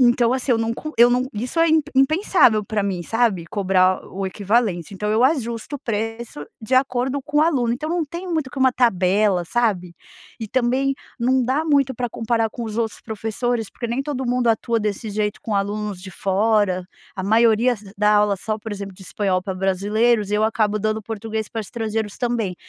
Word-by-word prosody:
Então 240 -1 +4
assim, 260 0 0
eu 225 - +2
não 225 0 0
co 305 +6 -6
eu 240 +1 +7
não 250 +1 +1
isso 245 +9 -4
é 330 0 +5
imp 310 -2 +2
impensável 270 - +3
pra 205 -1 -1
mim, 185 -3 -2
sabe, 225 -5 0
cobrar 185 -2 +2
o 195 +1 -5
equivalente, 200 -2 0
então 210 +2 -2
eu 225 +4 +3
ajusto 250 -2 -1
o - - -4
preço 225 - -4 0.2
de 220 - -7
acordo 260 +1 +1
com 295 +2 -1
o 305 - +6
aluno, 260 -8 +2
então 305 +6 -3
não 345 -1 0
tem 340 +5 -7
muito 310 -5 -1
que 270 - -8
uma 260 0 +5
tabela, 195 -5 +2
sabe, 180 -5 -1 0.4
e 225 - -5
também 260 +3 +1 0.2
não 255 +2 +2
dá 270 +6 0
muito 280 -4 +2
pra 245 -1 -2
comparar 225 0 0
com 235 - -7
os 220 0 -4
outros 225 -2 -2
professores 225 +1 -3
porque 235 - -6
nem 240 +3 -1
todo 275 -2 -3
mundo 245 0 0
atua 230 +1 +1
desse 210 0 -3
jeito 210 0 -2
com 220 - -4
alunos 205 -1 -2
de 185 0 -10
fora, 200 -1 +1 0.3
a 190 - -3
maioria 230 +3 +4
s 210 -4 -9
dá 210 0 +4
aula 205 -1 +2
só, 215 +3 -3
por 220 0 -8
exemplo 200 -1 -6
de 190 - -14
espanhol 185 -1 -1
pra 190 -1 -4
brasileiros, 205 +4 +1
eu 210 +1 +2
acabo 215 -1 +1
dando 215 +1 -1
português 220 0 -4
pra 225 - -4
estrangeiros 220 -1 -4
também, 235 -6 -1
225 Hz, 200 wpm, -21 LUFS, 205-245 Hz, 0.4 s, eu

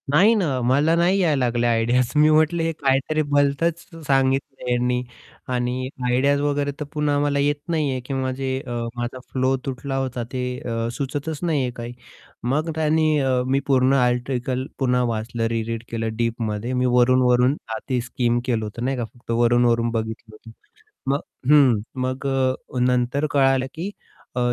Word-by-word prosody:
नाही 185 +11 +5
ना, 200 -4 +1 0.2
मला 140 +7 +3
नाही 175 +3 +3
यायला 150 -8 +2
लागल्या 120 0 +1
आयडियाज 120 +2 +2
मी 150 +1 +5
म्हटलं 155 +2 +3
हे 165 - +1
काहीतरी 135 +3 +1
भलतंच 145 +4 +2 0.3
सांगितलं 135 0 +1
ह्यांनी 125 0 +1 0.5
आणि 125 +1 -1 0.2
आयडियाज 140 +3 +2
वगैरे 145 0 0
तर 150 - -3
पुन्हा 150 -1 +1
मला 145 -1 +1
येत 145 +1 +2
नाही 155 -4 +1
आहे 130 - -2
किंवा 130 -1 -2
जे 135 +1 -3 0.2
अ, - - -5 0.2
माझा 120 +1 -4
फ्लो 130 0 +2
तुटला 135 0 -4
होता 130 -2 -2
ते 130 -1 -2 0.2
अ, 115 -1 -3
सुचतच 145 +4 -4
नाही 160 -5 +1
आहे 125 -1 -1
काही. 120 0 -6 0.5
मग 150 +7 0
त्यांनी 155 0 +2
अ, 130 -2 +1
मी 135 +1 +2
पूर्ण 130 -1 +3
आर्टिकल 125 0 0
पुन्हा 125 -2 +2
वाचलं 115 0 -2
री 115 0 -1
रीड 115 0 -4
केलं 115 -1 -2
डीपमध्ये. 115 0 -2
मी 125 0 +1
वरून-वरून 125 +1 +4 0.2
आती 125 +2 -2
स्कीम 120 0 0
केलं 115 -4 0
होतं 115 +3 -5
नाही 135 0 -1
का, 120 - -2
फक्त 120 -1 -9
वरून-वरून 120 0 +3
बघितलं 110 -1 -4
होतं. 115 +1 -14 0.6
मग 140 - +1 0.3
हं, 140 -6 +6 0.2
मग 130 +2 -2
अ, 130 -1 -1
नंतर 125 +3 +1
कळालं 135 -2 +3
की 170 +5 -4 0.5
अ, - - 0
130 Hz, 165 wpm, -22 LUFS, 120-145 Hz, 0.6 s, हं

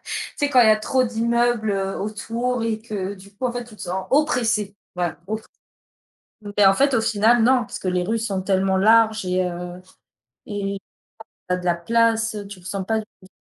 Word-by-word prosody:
Tu - - -5
sais 285 -1 +1
quand 255 -3 +6
il 225 - +6
y - - +7
a 215 - +7
trop 255 +4 +1
d'immeubles, 235 -1 +1
heu, 195 0 -2
autour, 230 +4 -2
et 220 -1 -1
que 205 -3 -5
du 200 +1 -16
coup 255 +6 -4
en 245 - 0
fait, 245 0 -4
tu 230 -3 -14
te - - -12
sens, 185 +1 -4
oppressé. 230 -8 +1 0.2
Voilà 175 -3 -2
op 220 +1 -3 1.1
mais 205 -2 +6
en 195 - +5
fait 275 +2 +3
au 225 - +3
final, 225 +1 +3
non, 250 -1 +4
puisque - - -8
les 180 -1 +1
rues 225 +4 -1
sont 195 -4 -2
tellement 190 0 +1
larges 220 0 +4
et 185 0 +1
heu 180 0 -5 0.7
et 200 -2 -3 0.7
tu 180 - +2
as - - 0
de 180 - -8
la 175 -1 +2
place, 225 +4 +1
heu, 205 -1 -6
tu 200 -2 -10
te 175 - -15
sens 195 -1 -3
pas 220 -1 +1
d 210 -3 -16
215 Hz, 215 wpm, -22 LUFS, 190-230 Hz, 1.1 s, y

